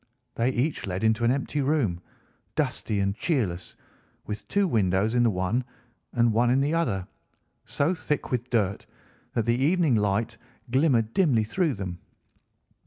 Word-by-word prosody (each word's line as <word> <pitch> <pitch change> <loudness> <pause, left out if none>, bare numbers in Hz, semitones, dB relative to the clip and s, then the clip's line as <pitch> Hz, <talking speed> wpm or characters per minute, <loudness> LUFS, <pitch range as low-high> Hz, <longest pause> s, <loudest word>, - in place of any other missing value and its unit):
They 115 +2 +1
each 130 -1 -1
led 95 +2 -3
into 110 +1 +2
an 120 - +4
empty 140 +2 -1
room, 130 - 0 0.5
dusty 105 -2 -1
and 100 0 +1
cheerless, 105 - -2 0.5
with 105 0 -6
two 200 -1 +2
windows 105 - +1
in 120 - +3
the 120 - +4
one 95 +5 0 0.5
and 120 -2 +3
one 120 +2 +3
in 130 +2 +3
the 145 +3 +1
other, 115 - 0 0.6
so 145 +6 0
thick 150 -4 -2
with 125 -1 -2
dirt 105 -5 0 0.5
that 115 - +1
the 115 - +3
evening 165 -2 +3
light 110 +2 0 0.3
glimmered 125 -5 +2
dimly 140 - +3
through 155 - 0
them. 90 -3 -5
115 Hz, 155 wpm, -26 LUFS, 105-140 Hz, 0.6 s, an